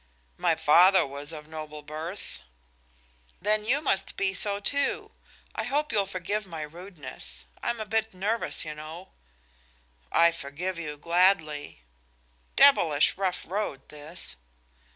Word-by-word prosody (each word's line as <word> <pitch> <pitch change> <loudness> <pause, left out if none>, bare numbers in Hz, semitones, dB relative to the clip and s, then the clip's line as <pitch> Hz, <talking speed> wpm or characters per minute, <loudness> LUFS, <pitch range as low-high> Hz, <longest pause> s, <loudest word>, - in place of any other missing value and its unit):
"My 165 - +3
father 175 +4 +6
was 140 +2 -2
of 150 -2 -7
noble 155 -1 -8
birth." 160 +6 -6 1.0
"Then 210 +2 +1
you 270 +6 +2
must 195 -8 0
be 195 -1 +1
so, 200 +1 +1
too. 280 +7 +1 0.4
I - - -2
hope 295 +5 0
you'll 200 -2 +1
forgive 195 +2 -3
my 165 -3 -5
rudeness. 150 - -7 0.2
I'm 235 - -1
a 215 - -3
bit 220 +1 0
nervous, 205 +3 -1
you 155 - -4
know." 155 +4 -9 1.0
"I 170 0 +6
forgive 170 +4 -4
you 150 -3 -5
gladly." 160 - +2 0.7
"Devilish 165 - +6
rough 190 -1 -1
road, 190 -6 -3
this." 150 - -6
175 Hz, 130 wpm, -28 LUFS, 150-200 Hz, 1.0 s, father